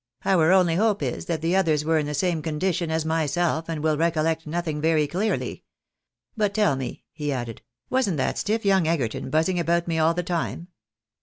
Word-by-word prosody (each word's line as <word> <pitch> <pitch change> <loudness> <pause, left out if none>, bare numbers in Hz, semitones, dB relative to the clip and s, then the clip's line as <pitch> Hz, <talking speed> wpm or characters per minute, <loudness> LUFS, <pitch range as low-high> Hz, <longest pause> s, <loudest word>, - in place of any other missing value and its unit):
" 120 - -31
Our 180 -4 +4
only 180 -3 +4
hope 215 0 +1
is - - -3
that 165 -2 -2
the 170 +3 +1
others 155 -6 +2
were 160 0 +3
in 150 - -2
the 150 - -3
same 165 +1 0
condition 170 +2 -1
as 160 0 -1
myself, 160 +1 0
and 155 -2 -3
will 155 -1 +1
recollect 160 -1 0
nothing 155 -2 -2
very 160 -1 +3
clearly. 195 +8 -2 0.7
But 210 -3 0
tell 210 -10 +3
me," 130 -2 -6
he 150 -2 -3
added, 120 -4 -4 0.2
" 120 - -53
wasn't 250 -11 +1
that 130 - -1
stiff 220 +1 -1
young 190 -4 +3
Egerton 135 -8 -1
buzzing 160 +5 +1
about 170 0 +1
me 165 -1 0
all 160 +1 +3
the 180 - -1
time? 175 0 -3
165 Hz, 205 wpm, -24 LUFS, 155-180 Hz, 0.7 s, Our